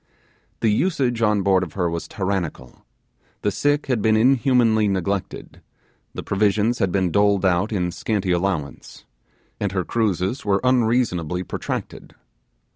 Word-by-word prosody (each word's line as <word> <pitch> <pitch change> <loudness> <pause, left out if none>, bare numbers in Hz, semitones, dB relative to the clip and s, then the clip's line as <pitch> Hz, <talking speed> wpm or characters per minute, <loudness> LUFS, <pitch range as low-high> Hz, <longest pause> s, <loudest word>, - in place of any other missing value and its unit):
The 110 - +3
usage 130 - 0
on 105 -3 +2
board 95 -1 +3
of 85 -4 -5
her 90 -3 -1
was 85 0 -4
tyrannical; 95 - -4 0.6
the 105 - +1
sick 145 +7 0
had 125 -6 -1
been 110 0 +3
inhumanly 120 -3 +3
neglected; 100 0 -3 0.5
the - - -5
provisions 105 +4 +1
had 95 -4 +1
been 95 -2 0
doled 100 0 +2
out 95 +4 +1
in 90 -4 -1
scanty 95 +2 -2
allowance; 85 -5 -3 0.5
and 100 -2 -2
her 95 -2 0
cruises 105 +2 -1
were 100 -1 +1
unreasonably 115 -9 +1
protracted. - - -6
100 Hz, 135 wpm, -22 LUFS, 90-115 Hz, 0.6 s, The